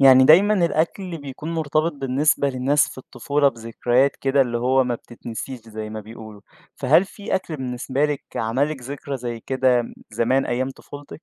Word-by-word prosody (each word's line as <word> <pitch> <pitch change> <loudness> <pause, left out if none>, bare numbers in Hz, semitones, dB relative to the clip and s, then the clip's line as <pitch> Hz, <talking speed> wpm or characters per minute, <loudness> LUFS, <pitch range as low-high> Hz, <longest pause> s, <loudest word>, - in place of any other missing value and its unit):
يعني 130 -1 +8
دايمًا 190 +9 +6
الأكل 170 +2 -1
بيكون 145 +3 -6
مرتبط 155 +1 0
بالنسبة 140 +1 +1
للناس 135 +3 +2
في - - -10
الطفولة 140 +3 0
بذكريات 120 +3 0
كده 135 +1 +2
اللي 120 -3 +1
هو 130 +2 +3
ما 125 -1 -1
بتتنسيش 120 +2 -8
زي 110 -1 -7
ما 110 0 -5
بيقولوا، 110 -1 -11 0.3
فهل 185 - +4
في 200 +1 -5
أكل 175 -4 -2
بالنسبة 130 +1 -2
لِك 150 -2 -1
عمل 115 +7 +1
لِك 140 -5 -6
ذكرى 140 +2 -5
زي 120 -2 -5
كده 130 -1 +2
م 115 - -9 0.2
زمان 120 +5 +1
أيام 130 +2 -1
طفولتِك؟ 145 +3 -11
130 Hz, 170 wpm, -22 LUFS, 120-145 Hz, 0.3 s, يعني